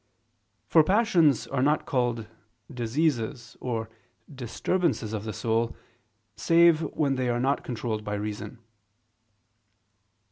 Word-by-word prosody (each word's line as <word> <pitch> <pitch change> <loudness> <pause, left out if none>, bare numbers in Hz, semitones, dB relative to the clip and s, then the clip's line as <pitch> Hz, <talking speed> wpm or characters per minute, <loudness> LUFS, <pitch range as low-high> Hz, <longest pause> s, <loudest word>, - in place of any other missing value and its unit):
For 160 - +5
passions 175 - +3
are 135 -2 -2
not 150 +3 +2
called 120 -4 0 0.5
"diseases" 120 -1 -1
or 115 -3 -2 0.5
"disturbances" 130 - -1
of 105 -1 -4
the 110 - -3
soul, 115 +2 -1 0.6
save 170 -1 +5 0.2
when 140 -4 +1
they 125 -1 0
are 120 0 0
not 135 +3 0
controlled 110 -3 -3
by 105 0 -3
reason. 105 +2 -5
125 Hz, 110 wpm, -27 LUFS, 110-150 Hz, 0.6 s, For